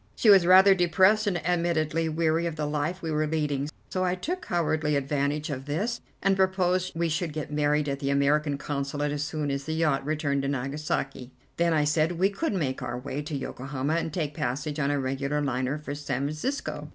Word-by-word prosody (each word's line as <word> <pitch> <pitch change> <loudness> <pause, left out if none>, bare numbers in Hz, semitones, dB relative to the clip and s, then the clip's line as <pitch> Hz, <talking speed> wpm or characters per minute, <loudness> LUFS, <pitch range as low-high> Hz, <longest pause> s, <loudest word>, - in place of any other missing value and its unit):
She 215 - +5
was 190 -4 +6
rather 190 +2 +8
depressed 190 +4 +3
and 175 -5 -1
admittedly 165 -2 +1
weary 165 +1 +1
of 165 - -4
the 150 -1 -2
life 150 +5 -2
we 160 - -2
were 155 0 +1
leading. 150 -2 -1 0.2
So 185 - 0
I 180 0 +1
took 355 - -4
cowardly 155 -3 +1
advantage 145 +2 -1
of 135 -1 -5
this 210 +11 -2 0.2
and 195 0 +4
proposed 185 -1 +1
we 170 +1 +1
should 160 +1 -1
get 150 -1 -5
married 150 0 +1
at 140 -1 -2
the 140 -1 -2
American 140 +1 +2
Consulate 145 +1 -2
as 145 0 -2
soon 150 -1 -2
as 140 0 -3
the 160 - -2
yacht 150 -4 +1
returned 145 -1 0
to 135 - -2
Nagasaki. 135 -1 -3 0.3
Then, 170 0 +2
I 155 -2 +3
said, 155 +3 +2
we 190 +4 +2
could 270 +6 -2
make 140 -9 -1
our 120 +1 -3
way 135 +3 -4
to 150 0 -4
Yokohama 135 +2 -3
and 165 -1 -1
take 150 -3 -2
passage 145 +1 -3
on 140 -1 +1
a 145 0 +1
regular 135 +2 -1
liner 130 0 -1
for 150 -1 -6
San 140 -2 -3
Francisco. 155 - -3
150 Hz, 205 wpm, -27 LUFS, 140-170 Hz, 0.3 s, rather